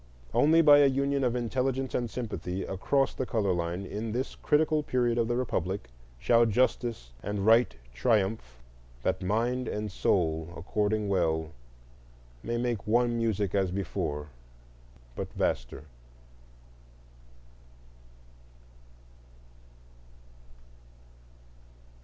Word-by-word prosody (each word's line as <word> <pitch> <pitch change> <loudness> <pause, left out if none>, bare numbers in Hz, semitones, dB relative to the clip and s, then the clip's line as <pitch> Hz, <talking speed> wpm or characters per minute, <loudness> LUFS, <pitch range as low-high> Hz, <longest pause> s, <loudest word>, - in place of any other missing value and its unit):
Only 165 +3 +5
by 145 -2 +8
a 145 - +6
union 140 +1 0
of 125 -1 +1
intelligence 130 +2 -1
and 120 -2 -1
sympathy 95 -6 -4
across 135 +8 0
the 130 - -3
color 100 -5 +1
line 85 +2 -3
in 105 +3 -4
this 130 +2 -2
critical 155 0 +2
period 120 -4 0
of 115 - +1
the 120 - 0
Republic 95 - -2 0.3
shall 115 - +4
justice 115 - 0
and 105 -1 -3
right 115 - +4 0.2
triumph, 95 - 0 0.4
"That - - 0
mind 120 +6 0
and 105 -1 -3
soul 80 -4 0
according 105 +4 -1
well, 80 -4 0 0.9
May 120 - -2
make 120 -3 -2
one 120 +2 +2
music 105 -4 0
as 95 -2 +1
before, 75 -5 -3 0.9
But - - -5
vaster." - - -2
110 Hz, 105 wpm, -29 LUFS, 95-125 Hz, 0.9 s, by